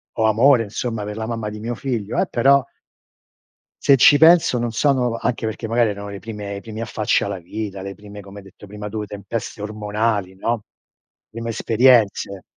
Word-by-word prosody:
ho 110 - +1
amore, 115 +3 +4
insomma, 115 +1 -4
per 105 0 -6
la 110 - -3
mamma 115 -2 -3
di 105 0 -8
mio 120 +2 -4
figlio, 115 -4 -3
eh, - - +1
però 135 +2 +4 1.2
se 140 - +6
ci 145 +3 +7
penso 160 -5 +5
non 120 -1 -2
sono 125 -2 +1
anche 115 -2 -2
perché 110 +1 -4
magari 115 -1 +2
erano 100 0 -6
le 100 -1 -7
prime 105 -3 -7
i 100 - -7
primi 110 0 -8
affacci 110 -2 0
alla 100 -2 -4
vita, 100 +2 -6
le 100 0 -6
prime, 105 +1 -11
come 100 +1 -13
hai 100 - -11
detto 95 - -15
prima 105 +1 -8
tu, 105 0 -4
tempeste 105 +1 -6
ormonali, 105 -2 -2
no, 115 +1 -2 0.7
prime 115 +1 -6
esperienze. 115 -4 +2
110 Hz, 185 wpm, -21 LUFS, 105-120 Hz, 1.2 s, ci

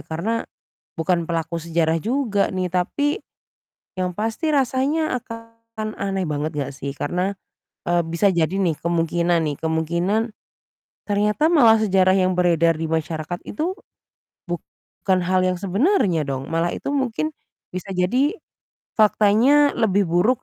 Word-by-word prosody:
karena 200 +9 -3 0.5
bukan 170 +1 +1
pelaku 165 0 -3
sejarah 165 -1 +1
juga 220 - 0
nih. 185 -1 -1
Tapi 285 - -1 0.8
yang 180 -1 -1
pasti 225 - -1
rasanya 275 +2 +1
akan 230 -1 -8
aneh 195 -1 -1
banget 150 +2 -2
nggak 145 -3 -2
sih 140 0 -6
karena, 180 +7 -2 0.5
eee, 175 0 +2
bisa 170 +5 +1
jadi 170 -4 +1
nih 190 -4 +1
kemungkinan 170 0 +1
nih, 145 - -2
kemungkinan 170 +8 0 0.7
ternyata 210 +10 +1
malah 240 -9 +6
sejarah 190 -2 +4
yang 185 -1 +1
beredar 165 -2 +3
di 160 - -2
masyarakat 160 +1 -3
itu 335 - -3 0.7
bukan 185 +1 -3
hal 185 +1 +2
yang 185 0 +1
sebenarnya 195 - +1
dong, 135 +1 -4
malah 165 +1 0
itu - - -4
mungkin 275 +2 -1 0.4
bisa 185 +1 -6
jadi 250 - +1 0.6
faktanya 220 +7 +5
lebih 205 -3 +3
buruk 200 +9 +2
185 Hz, 130 wpm, -22 LUFS, 170-225 Hz, 0.8 s, malah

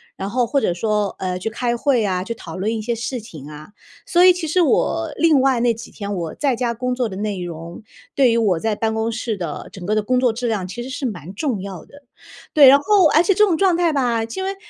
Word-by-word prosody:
然 195 - -5
后 245 +2 +1
或 275 +3 0
者 175 - +1
说， 210 +1 -1
呃， 185 -1 -2
去 220 - -3
开 240 +1 -2
会 240 -3 +1
啊， 185 -2 -1
去 230 +4 -5
讨 165 -6 -9
论 205 +4 -2
一 225 - -3
些 235 +2 -2
事 240 +2 -4
情 155 - -11
啊。 150 +3 -11 0.4
所 350 -1 +3
以 365 - +8
其 355 -2 -3
实 355 +4 +2
我， 330 +2 +1
另 315 -5 +4
外 260 -2 +2
那 235 0 +2
几 225 - -10
天， 205 -1 -5
我 170 -4 -4
在 275 -4 0
家 235 -1 -1
工 250 +2 -2
作 245 -3 -1
的 190 - -7
内 205 -3 -3
容， 170 +1 -8 0.3
对 265 -3 +4
于 230 - +2
我 195 -7 +1
在 220 +2 -1
办 220 +1 -1
公 220 +1 -1
室 225 -1 -3
的 170 -6 -6
整 185 - -9
个 210 +4 -1
的 215 - +1
工 250 +3 +1
作 250 -2 +2
质 240 +2 -4
量 205 -5 -2
其 240 +6 -6
实 260 - -8
是 275 0 -4
蛮 185 - -7
重 245 -3 -2
要 190 -5 -8
的。 285 0 -18 0.5
对， 285 -3 +8
然 275 +2 +8
后 390 +1 +4
而 315 +2 +4
且 390 - +3
这 425 +2 +4
种 345 -5 0
状 375 -1 +3
态 345 -2 +2
吧， 240 -5 0
因 230 +12 -5
为 390 +1 -3
230 Hz, 285 characters per minute, -20 LUFS, 200-275 Hz, 0.5 s, 以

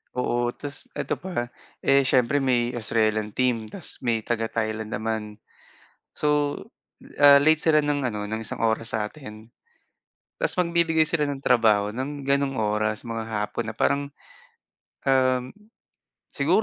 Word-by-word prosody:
Oo, 120 -1 0
ta's 145 +3 -7
eto - - -3
pa, 175 -10 -4 0.3
eh, 140 0 +4
siyempre 130 +1 +2
may 120 -2 +1
Australian 110 -2 0
team 115 -3 -1
ta's 185 - -2
may 115 -2 +1
taga-Thailand 110 -1 -3
naman. 110 0 -2 0.9
So, 150 -1 +1 0.6
ah, 145 -1 +9
late 155 +2 +4
sila 155 -2 +3
ng 145 -3 0
ano, 105 -2 -4
ng 110 +2 -4
1 115 - -2
oras 115 0 0
sa 105 - -1
atin. 110 -6 -12 0.9
Ta's - - 0
magbibigay 170 -2 +2
sila 165 -1 0
ng 140 - -4
trabaho 110 -5 +2
ng 135 +2 -5
ganong 140 -1 +1
oras 110 +1 -1
mga 115 -1 -5
hapon 105 -1 -3
na - - -8
parang, 140 0 +1 1.0
um, 130 -1 +2 0.8
siguro 170 +9 +2
125 Hz, 135 wpm, -25 LUFS, 110-145 Hz, 1.0 s, ah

